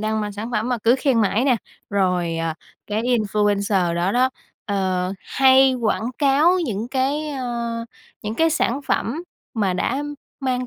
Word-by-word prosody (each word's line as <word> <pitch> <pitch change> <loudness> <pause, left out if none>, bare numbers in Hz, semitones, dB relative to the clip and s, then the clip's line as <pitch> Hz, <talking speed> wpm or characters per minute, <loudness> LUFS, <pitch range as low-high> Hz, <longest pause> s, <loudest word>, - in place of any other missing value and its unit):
đang 215 0 0
mang 205 -1 -3
sản 215 +4 -6
phẩm 230 0 -1
mà 245 -2 0
cứ 235 +2 +5
khen 255 -5 +2
mãi 215 +4 +2
nè, 255 -4 +4 0.3
rồi, 180 -4 +1
à, 165 -1 -2 0.3
cái 210 +2 -1
influencer 205 -6 +1
đó 175 +3 0
đó, 255 +1 +3 0.3
ờ, 185 -2 -1
hay 265 0 +4
quảng 225 -2 0
cáo 295 +6 +4
những 225 -3 -3
cái, 280 +3 0
ơ, 240 -4 -3 0.5
những 210 +1 -3
cái 325 +5 +3
sản 275 -3 0
phẩm 300 +9 -1 0.3
mà 200 -4 +1
đã 255 +10 -1 0.4
mang 255 -1 -1
230 Hz, 165 wpm, -22 LUFS, 200-260 Hz, 0.5 s, cứ